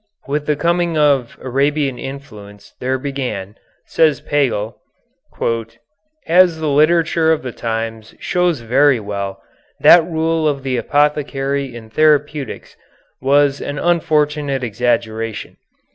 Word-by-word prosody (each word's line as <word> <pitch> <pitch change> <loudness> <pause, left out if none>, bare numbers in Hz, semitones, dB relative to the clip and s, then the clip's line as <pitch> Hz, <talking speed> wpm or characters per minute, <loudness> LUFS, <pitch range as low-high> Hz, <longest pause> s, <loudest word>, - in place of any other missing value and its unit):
With 150 +1 -2
the 150 - +2
coming 170 +2 0
of 140 -5 +2
Arabian 140 +1 0
influence 105 -7 -10
there 130 +1 -1
began, 130 -8 -4 0.3
says 155 -5 +2
Pagel, 120 -7 -1 1.5
"as 175 -1 +4
the 155 -1 -1
literature 160 +2 +3
of 160 - 0
the 125 - -5
times 115 -1 -5
shows 180 -6 0
very 130 +3 +3
well, 100 -2 -5 0.4
that 170 -1 +7
rule 160 -1 0
of 140 -3 -1
the 130 -1 -1
apothecary 140 -2 0
in 110 -2 -11
therapeutics 150 -1 0 0.4
which 130 - -9
was 140 -1 +3
an 145 - -5
unfortunate 150 -4 0
exaggeration. 115 -1 -2
140 Hz, 115 wpm, -18 LUFS, 120-155 Hz, 1.5 s, that